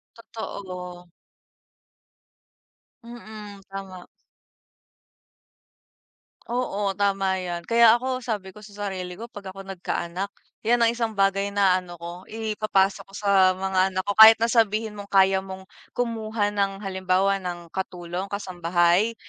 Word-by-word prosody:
Totoo. 180 Hz, -6 st, -8 dB, 1.9 s
Mm, 215 Hz, -4 st, -10 dB
tama. 195 Hz, -2 st, -8 dB, 2.4 s
Oo, 210 Hz, -5 st, -1 dB
tama 195 Hz, -1 st, +1 dB
'yan 175 Hz, -1 st, -4 dB
kaya 230 Hz, -1 st, +6 dB
ako 255 Hz, +1 st, -2 dB
sabi 210 Hz, -6 st, -4 dB
ko 210 Hz, -, -13 dB
sa 205 Hz, -1 st, -7 dB
sarili 185 Hz, -2 st, -5 dB
ko 225 Hz, -, -7 dB
pag 200 Hz, -4 st, -8 dB
ako 195 Hz, +1 st, -10 dB
nagkaanak, 190 Hz, 0 st, -4 dB, 0.3 s
'yan 235 Hz, +2 st, +3 dB
ang 230 Hz, -, +4 dB
1 230 Hz, -2 st, -2 dB
bagay 195 Hz, 0 st, +2 dB
na, 195 Hz, -2 st, +3 dB
ano, 175 Hz, -1 st, -11 dB
ko 170 Hz, +1 st, -7 dB, 0.2 s
ipapasa 215 Hz, -3 st, 0 dB
ko 195 Hz, -, -14 dB
sa 195 Hz, -2 st, +4 dB
mga 190 Hz, 0 st, +1 dB
anak 185 Hz, 0 st, -2 dB
ko 205 Hz, -, 0 dB
kahit 220 Hz, +1 st, +10 dB
na 230 Hz, -, +1 dB
sabihin 220 Hz, -1 st, +2 dB
mong 205 Hz, -1 st, -9 dB
kaya 190 Hz, -1 st, +4 dB
mong 190 Hz, 0 st, -9 dB, 0.3 s
kumuha 220 Hz, -3 st, -1 dB
ng 200 Hz, 0 st, -1 dB
halimbawa 190 Hz, +1 st, +1 dB
ng 175 Hz, -2 st, -6 dB
katulong, 180 Hz, 0 st, -4 dB
kasambahay, 180 Hz, +2 st, +1 dB
195 Hz, 130 wpm, -24 LUFS, 185-215 Hz, 2.4 s, kahit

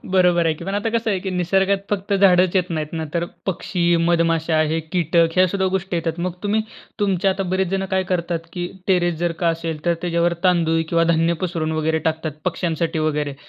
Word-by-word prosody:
बरोबर 180 Hz, -2 st, +3 dB
आहे 160 Hz, -, +2 dB
की. 165 Hz, -, -10 dB
पण 195 Hz, +2 st, -3 dB
आता 205 Hz, +2 st, -1 dB
कसं 230 Hz, -1 st, 0 dB
आहे 195 Hz, -, 0 dB
कि 190 Hz, -, -4 dB
निसर्गात 190 Hz, +2 st, +1 dB
फक्त 200 Hz, 0 st, -2 dB
झाडच 185 Hz, -1 st, +4 dB
येत 180 Hz, -1 st, 0 dB
नाहीत 155 Hz, -2 st, -3 dB
ना 160 Hz, -, -2 dB
तर 170 Hz, 0 st, +1 dB, 0.2 s
पक्षी, 175 Hz, -1 st, 0 dB
मधमाशा 165 Hz, -1 st, +2 dB
हे 165 Hz, -, 0 dB
कीटक 170 Hz, -1 st, +3 dB
ह्या 185 Hz, 0 st, +5 dB
सुद्धा 190 Hz, +1 st, 0 dB
गोष्टी 190 Hz, -1 st, -3 dB
येतात. 165 Hz, 0 st, -2 dB
मग 180 Hz, 0 st, -1 dB
तुम्ही 210 Hz, +1 st, +1 dB, 0.4 s
तुमच्या 195 Hz, -2 st, +2 dB
आता 195 Hz, +1 st, -1 dB
बरेच 190 Hz, -1 st, +1 dB
जण 195 Hz, 0 st, -1 dB
काय 190 Hz, 0 st, +2 dB
करतात 170 Hz, -1 st, -2 dB
की 175 Hz, -1 st, -3 dB, 0.2 s
टेरेस 175 Hz, -2 st, +2 dB
जर 175 Hz, 0 st, 0 dB
का 170 Hz, -, +4 dB
असेल 165 Hz, -2 st, -3 dB
तर 170 Hz, 0 st, +2 dB
त्याच्यावर 170 Hz, 0 st, +1 dB
तांदूळ 165 Hz, -3 st, +3 dB
किंवा 165 Hz, 0 st, +2 dB
धान्य 165 Hz, +1 st, +2 dB
पसरून 165 Hz, -3 st, -2 dB
वगैरे 160 Hz, 0 st, 0 dB
टाकतात 160 Hz, 0 st, -3 dB
पक्ष्यांसाठी 165 Hz, -2 st, -1 dB
वगैरे. 150 Hz, -2 st, -1 dB
175 Hz, 205 wpm, -21 LUFS, 165-190 Hz, 0.4 s, ह्या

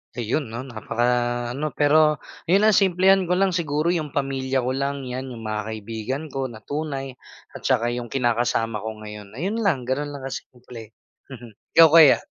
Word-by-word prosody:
Ayun 120 Hz, +4 st, -1 dB
'no, 115 Hz, +3 st, -6 dB
napaka 120 Hz, -1 st, -2 dB, 0.4 s
ano, 145 Hz, +4 st, -4 dB
pero 150 Hz, +1 st, +4 dB, 0.3 s
yun 195 Hz, +5 st, +4 dB
ha 215 Hz, -, +6 dB
simplehan 190 Hz, -1 st, +4 dB
ko 180 Hz, -, +2 dB
lang. 195 Hz, 0 st, +2 dB
Siguro 160 Hz, -1 st, 0 dB
'yung 155 Hz, -5 st, -3 dB
pamilya 135 Hz, -2 st, -1 dB
ko 125 Hz, -, -1 dB
lang, 140 Hz, +1 st, -2 dB
'yan 130 Hz, 0 st, -5 dB
'yung 115 Hz, -, -9 dB
mga 110 Hz, -1 st, -3 dB
kaibigan 110 Hz, +5 st, -5 dB
ko 135 Hz, -1 st, -2 dB
na 110 Hz, -3 st, -12 dB
tunay 140 Hz, -3 st, -4 dB, 0.4 s
at -, -, -10 dB
saka 120 Hz, -3 st, +2 dB
'yung 120 Hz, 0 st, -4 dB
kinakasama 120 Hz, -3 st, 0 dB
ko 110 Hz, 0 st, -7 dB
ngayon. 105 Hz, 0 st, -10 dB
Ayun 195 Hz, -, -2 dB
lang, 180 Hz, -, +1 dB
gano'n 130 Hz, +4 st, -2 dB
lang 140 Hz, -, -9 dB
kasimple. 120 Hz, -4 st, -9 dB, 0.3 s
Mhm, 120 Hz, -4 st, -11 dB, 0.2 s
ikaw 165 Hz, -1 st, +9 dB
kaya? 160 Hz, -4 st, +8 dB
135 Hz, 175 wpm, -23 LUFS, 120-155 Hz, 0.4 s, ikaw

